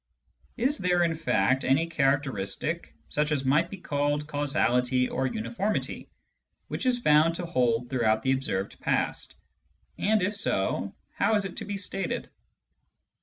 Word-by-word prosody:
Is 265 Hz, +5 st, +1 dB
there, 180 Hz, -1 st, +2 dB
in 165 Hz, -1 st, +1 dB
fact, 155 Hz, -4 st, +1 dB
any 135 Hz, +5 st, +3 dB
characteristic, 135 Hz, -, -1 dB
such 150 Hz, -, 0 dB
as 140 Hz, -3 st, 0 dB
might 150 Hz, +6 st, +3 dB
be 195 Hz, -, -7 dB
called 145 Hz, -3 st, -1 dB
causality 130 Hz, -4 st, +1 dB
or 130 Hz, +1 st, -1 dB
uniformity, 215 Hz, -, -2 dB, 0.6 s
which -, -, -2 dB
is 250 Hz, -1 st, +3 dB
found 160 Hz, -6 st, +4 dB
to 175 Hz, -, -3 dB
hold 125 Hz, -7 st, +1 dB
throughout 110 Hz, -4 st, +2 dB
the 130 Hz, -, +2 dB
observed 115 Hz, -8 st, -2 dB
past? -, -, -1 dB, 0.6 s
And 215 Hz, -1 st, +2 dB
if 205 Hz, +3 st, 0 dB
so, 100 Hz, -, -1 dB, 0.2 s
how 215 Hz, +2 st, +2 dB
is 205 Hz, -2 st, +2 dB
it 185 Hz, -, -7 dB
to -, -, -4 dB
be 205 Hz, -1 st, -4 dB
stated 195 Hz, 0 st, -3 dB
150 Hz, 145 wpm, -27 LUFS, 130-185 Hz, 0.6 s, found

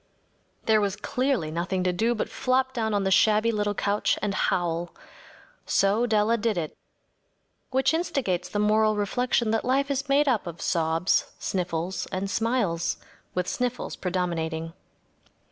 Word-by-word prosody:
There 220 Hz, -1 st, +4 dB
was 200 Hz, -1 st, 0 dB
clearly 245 Hz, -, -1 dB
nothing 180 Hz, +3 st, -1 dB
to 180 Hz, -1 st, +1 dB
do 225 Hz, +6 st, +1 dB
but 215 Hz, -, -2 dB
flop 260 Hz, +1 st, 0 dB
down 220 Hz, -3 st, -1 dB
on 200 Hz, -, +1 dB
the 190 Hz, -, 0 dB
shabby 215 Hz, +3 st, +4 dB
little 205 Hz, -1 st, -1 dB
couch 205 Hz, +1 st, +1 dB
and 205 Hz, -1 st, -1 dB
howl. 175 Hz, -2 st, -1 dB, 0.7 s
So 210 Hz, +5 st, +2 dB
Della 220 Hz, +1 st, +3 dB
did 220 Hz, -2 st, 0 dB
it. 160 Hz, -3 st, -3 dB, 0.9 s
Which 265 Hz, +3 st, +2 dB
instigates 270 Hz, -, -1 dB
the -, -, -3 dB
moral 215 Hz, +1 st, +3 dB
reflection 230 Hz, +2 st, 0 dB
that 225 Hz, -, +1 dB
life 275 Hz, +3 st, +1 dB
is 280 Hz, +1 st, -2 dB
made 285 Hz, +2 st, +4 dB
up 230 Hz, -8 st, +1 dB
of 170 Hz, -1 st, -7 dB
sobs, 165 Hz, +2 st, +1 dB
sniffles, 180 Hz, 0 st, -2 dB
and 195 Hz, +1 st, -3 dB
smiles, 225 Hz, -8 st, 0 dB, 0.4 s
with 180 Hz, 0 st, -1 dB
sniffles 250 Hz, -1 st, -2 dB
predominating. 165 Hz, -3 st, -2 dB
210 Hz, 145 wpm, -26 LUFS, 180-240 Hz, 0.9 s, There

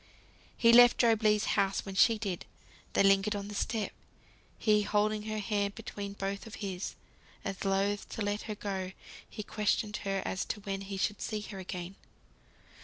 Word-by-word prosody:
He 230 Hz, 0 st, +6 dB
left 245 Hz, 0 st, +9 dB
Job 230 Hz, -2 st, +4 dB
Legh's 210 Hz, -1 st, +3 dB
house 195 Hz, -1 st, +1 dB
when 195 Hz, -, -6 dB
she 225 Hz, +4 st, +5 dB
did. 195 Hz, -5 st, -3 dB, 0.5 s
They -, -, +4 dB
lingered 195 Hz, +2 st, +4 dB
on 200 Hz, 0 st, -4 dB
the -, -, -6 dB
step, 220 Hz, +1 st, -1 dB, 0.7 s
he 210 Hz, -2 st, +3 dB
holding 210 Hz, +1 st, +1 dB
her 215 Hz, 0 st, -2 dB
hand 205 Hz, -1 st, -1 dB
between 205 Hz, -3 st, -6 dB
both 200 Hz, +2 st, -4 dB
of 220 Hz, -, -8 dB
his, 190 Hz, -2 st, -4 dB, 0.5 s
as 195 Hz, -2 st, -4 dB
loth 195 Hz, +1 st, 0 dB
to 220 Hz, -, -2 dB
let 205 Hz, +1 st, -1 dB
her 215 Hz, -, -2 dB
go; 190 Hz, -2 st, -4 dB, 0.4 s
he 210 Hz, -, -6 dB
questioned 210 Hz, 0 st, 0 dB
her 195 Hz, -1 st, -2 dB
as 190 Hz, -, -1 dB
to 215 Hz, -, -3 dB
when 195 Hz, -1 st, -3 dB
he 195 Hz, 0 st, -5 dB
should 190 Hz, +3 st, -1 dB
see 215 Hz, -2 st, -2 dB
her 200 Hz, -2 st, -7 dB
again. 185 Hz, 0 st, -6 dB
205 Hz, 180 wpm, -31 LUFS, 195-215 Hz, 0.7 s, left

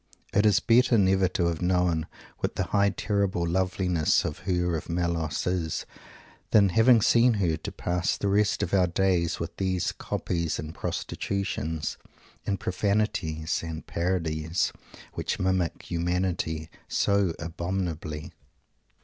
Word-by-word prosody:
It 105 Hz, +2 st, +4 dB
is 105 Hz, +1 st, +5 dB
better 120 Hz, 0 st, +4 dB
never 95 Hz, -1 st, +4 dB
to 85 Hz, -, -1 dB
have 85 Hz, -2 st, -1 dB
known 90 Hz, -3 st, +1 dB, 0.3 s
what -, -, -2 dB
the -, -, 0 dB
high, 100 Hz, -1 st, +2 dB
terrible 100 Hz, -3 st, 0 dB
loveliness 90 Hz, -2 st, +1 dB
of 75 Hz, -, -4 dB
Her 90 Hz, -2 st, 0 dB
of 80 Hz, -, -5 dB
Melos 85 Hz, -2 st, -1 dB
is 90 Hz, -3 st, -1 dB, 0.6 s
than, 100 Hz, -3 st, +5 dB
having 115 Hz, +3 st, +5 dB
seen 120 Hz, 0 st, +5 dB
her, 90 Hz, -6 st, +1 dB
to -, -, -6 dB
pass 90 Hz, 0 st, -1 dB
the 100 Hz, -, -2 dB
rest 105 Hz, +1 st, +2 dB
of -, -, -3 dB
our 95 Hz, -2 st, +4 dB
days 85 Hz, -2 st, +1 dB
with 85 Hz, -, -5 dB
these 95 Hz, -2 st, 0 dB
copies, 85 Hz, -2 st, -2 dB
and 75 Hz, +1 st, -6 dB
prostitutions, 80 Hz, -7 st, -3 dB, 0.5 s
and 100 Hz, -1 st, 0 dB
profanations, 90 Hz, -5 st, -1 dB
and 80 Hz, -1 st, -6 dB
parodies, 85 Hz, -2 st, -1 dB, 0.4 s
"which -, -, -2 dB
mimic 95 Hz, -3 st, 0 dB
humanity 85 Hz, -2 st, -2 dB, 0.2 s
so 100 Hz, -4 st, +1 dB
abominably"! 85 Hz, -2 st, -4 dB
90 Hz, 130 wpm, -27 LUFS, 85-100 Hz, 0.6 s, is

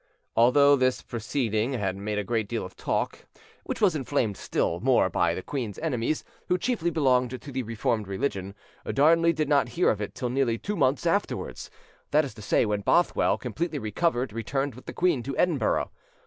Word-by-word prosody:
Although 140 Hz, +5 st, +6 dB
this 130 Hz, -1 st, +1 dB
proceeding 115 Hz, 0 st, -1 dB
had 100 Hz, -6 st, -1 dB
made 105 Hz, +2 st, -3 dB
a 105 Hz, -, 0 dB
great 110 Hz, 0 st, -1 dB
deal 115 Hz, -4 st, -2 dB
of 90 Hz, -, -11 dB
talk, -, -, -2 dB, 0.4 s
which -, -, -4 dB
was 195 Hz, -6 st, +3 dB
inflamed 130 Hz, -7 st, 0 dB
still 85 Hz, -2 st, -1 dB
more 120 Hz, -5 st, +3 dB
by 85 Hz, 0 st, +1 dB
the 95 Hz, -, -5 dB
queen's 120 Hz, -8 st, -4 dB
enemies, 150 Hz, -2 st, -1 dB, 0.2 s
who 180 Hz, -, +2 dB
chiefly 195 Hz, -5 st, 0 dB
belonged 130 Hz, -5 st, +1 dB
to 140 Hz, -, -10 dB
the 130 Hz, 0 st, -2 dB
Reformed 115 Hz, -2 st, -1 dB
religion, 100 Hz, -2 st, -3 dB, 0.4 s
Darnley 165 Hz, +4 st, +4 dB
did 155 Hz, -2 st, -1 dB
not 145 Hz, -1 st, +3 dB
hear 180 Hz, -, +4 dB
of 105 Hz, -, -3 dB
it 105 Hz, -, -5 dB
till 125 Hz, -, -2 dB
nearly 125 Hz, -3 st, +1 dB
two 210 Hz, -, -4 dB
months 135 Hz, -4 st, +1 dB
afterwards—that 150 Hz, +1 st, -2 dB
is 135 Hz, -, -7 dB
to 110 Hz, -, -12 dB
say, 105 Hz, -, +2 dB
when 105 Hz, -1 st, -1 dB
Bothwell, 170 Hz, -, +2 dB
completely 150 Hz, +6 st, -3 dB
recovered, 125 Hz, 0 st, -1 dB
returned 135 Hz, +5 st, -2 dB
with 130 Hz, -, -14 dB
the -, -, -5 dB
queen 175 Hz, -8 st, +1 dB
to 135 Hz, +3 st, -5 dB
Edinburgh. 155 Hz, -11 st, +1 dB
130 Hz, 185 wpm, -27 LUFS, 110-145 Hz, 0.4 s, Although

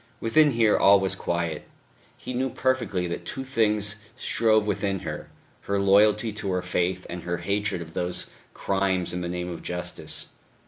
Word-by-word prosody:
Within 150 Hz, +7 st, +4 dB
here 115 Hz, -2 st, +4 dB
all 100 Hz, 0 st, +7 dB
was 95 Hz, -1 st, 0 dB
quiet. 85 Hz, -3 st, -2 dB, 0.5 s
He -, -, -6 dB
knew 130 Hz, +2 st, 0 dB
perfectly 120 Hz, -8 st, 0 dB
that 85 Hz, -, -4 dB
two 135 Hz, -, -4 dB
things 110 Hz, -5 st, +1 dB, 0.2 s
strove 110 Hz, -2 st, +3 dB
within 100 Hz, -2 st, -1 dB
her, 75 Hz, -2 st, -6 dB, 0.4 s
her 100 Hz, 0 st, 0 dB
loyalty 105 Hz, +3 st, +4 dB
to 100 Hz, -2 st, -3 dB
her 90 Hz, 0 st, -1 dB
faith 90 Hz, +1 st, -1 dB
and 90 Hz, 0 st, -6 dB
her 85 Hz, 0 st, -2 dB
hatred 100 Hz, 0 st, -1 dB
of 80 Hz, 0 st, -14 dB
those 90 Hz, +1 st, -2 dB, 0.3 s
crimes 95 Hz, -2 st, 0 dB
in 90 Hz, -, -3 dB
the 85 Hz, -, -3 dB
name 90 Hz, 0 st, -3 dB
of 85 Hz, -, -7 dB
justice. 90 Hz, 0 st, -4 dB
100 Hz, 170 wpm, -26 LUFS, 90-110 Hz, 0.5 s, all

